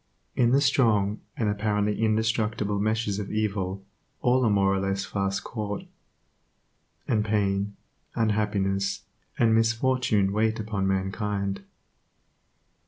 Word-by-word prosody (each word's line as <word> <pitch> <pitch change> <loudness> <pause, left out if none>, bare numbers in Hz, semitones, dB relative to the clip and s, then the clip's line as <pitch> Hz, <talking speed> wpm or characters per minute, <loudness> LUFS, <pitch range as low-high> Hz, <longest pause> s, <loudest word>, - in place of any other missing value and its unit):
In 120 -2 +3
the 135 +3 +4
strong, 110 -7 +2 0.2
and 110 - 0
apparently 105 0 0
indestructible 110 -2 0
meshes 110 -1 0
of 100 - -5
evil 100 -3 -2 0.4
all 125 +1 +3
are 115 - +3
more 100 -1 +3
or 95 - +1
less 95 0 -1
fast 100 0 -2
caught, 105 -3 -4 1.2
and 105 -2 +2
pain, 100 -1 0 0.4
unhappiness, 100 -3 0 0.3
and 115 -2 +4
misfortune 115 -3 +2
wait 110 +2 +1
upon 105 -3 -2
mankind. 100 +1 -1
105 Hz, 110 wpm, -26 LUFS, 100-110 Hz, 1.2 s, the